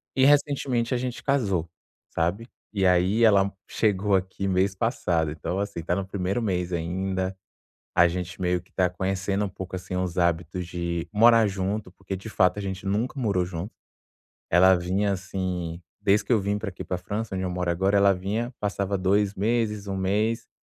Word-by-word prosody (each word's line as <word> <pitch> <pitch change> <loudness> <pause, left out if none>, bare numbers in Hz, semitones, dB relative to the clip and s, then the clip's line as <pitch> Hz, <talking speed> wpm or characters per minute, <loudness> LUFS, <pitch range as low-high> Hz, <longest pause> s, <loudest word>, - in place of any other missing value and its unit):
E 130 - +3
recentemente 135 -4 +3
a - - +2
gente 125 0 -4
casou, 100 - +1 0.5
sabe? 90 +8 -1 0.2
E 100 -3 0
aí 90 +5 +3
ela 100 -3 +6
m 100 - -3 0.2
chegou 105 -2 +1
aqui 95 +1 -1
mês 95 +1 +1
passado, 90 - 0
então 80 +5 -3
assim, 100 -3 -3
está 85 +2 -1
no 100 0 -2
primeiro 95 +3 -2
mês 90 -4 -1
ainda, 95 +2 -2 0.6
a 85 - +6
gente 90 0 -4
meio 90 -1 0
que - - -28
está 90 -1 +1
conhecendo 95 +2 -1
um 100 - -2
pouco, 95 0 -7
assim, 90 0 -5
os 90 -1 -2
hábitos 85 +1 0
de 85 -1 -3
morar 115 +1 +6
junto, 100 0 -3
porque 95 +1 -6
de 95 +4 -8
fato 90 -3 +2
a - - -2
gente 95 -1 -5
nunca 110 +8 -1
morou 100 -6 +1
junto. 90 +3 -6 0.8
Ela 95 +2 +7
vinha, 95 +4 0
assim 90 -3 -4 0.2
desde 100 +1 +3
que - - -3
eu 115 - +5
vim 100 +1 -1
pra 105 0 -4
aqui 90 - -8
pra 90 - -2
França, 105 +4 -4
onde 95 - -2
eu 90 - -1
moro 90 0 -2
agora, 95 +4 +2
ela 100 0 +5
vinha, 105 +7 -3
passava 100 -1 -1
2 100 +2 +2
meses, 105 -1 0
1 100 - -2
mês, 105 +4 0
95 Hz, 190 wpm, -26 LUFS, 90-105 Hz, 0.8 s, Ela